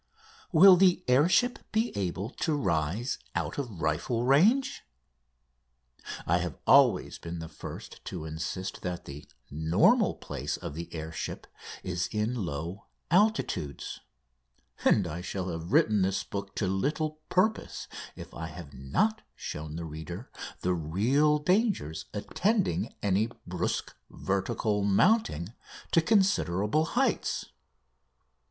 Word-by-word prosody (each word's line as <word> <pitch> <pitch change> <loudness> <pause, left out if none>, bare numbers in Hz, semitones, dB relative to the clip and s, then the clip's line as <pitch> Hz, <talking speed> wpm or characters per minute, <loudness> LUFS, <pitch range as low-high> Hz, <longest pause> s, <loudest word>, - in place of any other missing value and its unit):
Will 185 +3 +9
the 180 -1 +4
air 135 +6 +5
ship 245 +6 +3
be 220 +2 0
able 100 +3 -2
to 160 0 -1
rise 95 - -1 0.2
out - - -2
of 115 -10 -5
rifle 85 - 0
range? 220 - +4 1.4
I 90 +2 +3
have 85 -3 -4
always - - +5
been 85 +1 -6
the 80 0 -6
first 80 - -9
to 80 - -5
insist 80 +4 -4
that 90 -1 -4
the 70 +1 -9 0.2
normal 80 +3 +3
place - - -4
of - - -6
the 85 +3 -7
air 80 -1 -5
ship - - -5 0.4
is 90 -1 -1
in 105 +2 0
low 85 -3 -4 0.2
altitudes, 175 - +1 0.8
and 100 - +4
I 85 +1 -4
shall 95 0 -4
have 85 +1 -5
written 105 -2 +4
this 95 +1 +1
book 100 0 -6
to 105 - 0
little 150 - -1
purpose 215 +4 0 0.3
if - - -10
I 80 - -5
have 80 -3 -10
not 70 - 0
shown 75 0 -6
the 85 0 -4
reader 80 - -7 0.3
the 90 - +1
real 115 - +2
dangers 180 - 0
attending 115 - 0
any 100 +3 +2 0.2
brusque - - -2 0.2
vertical 105 +1 -1
mounting 100 - +3 0.4
to 165 - +5
considerable 155 - +2
heights. 260 +10 0
100 Hz, 125 wpm, -29 LUFS, -, 1.4 s, Will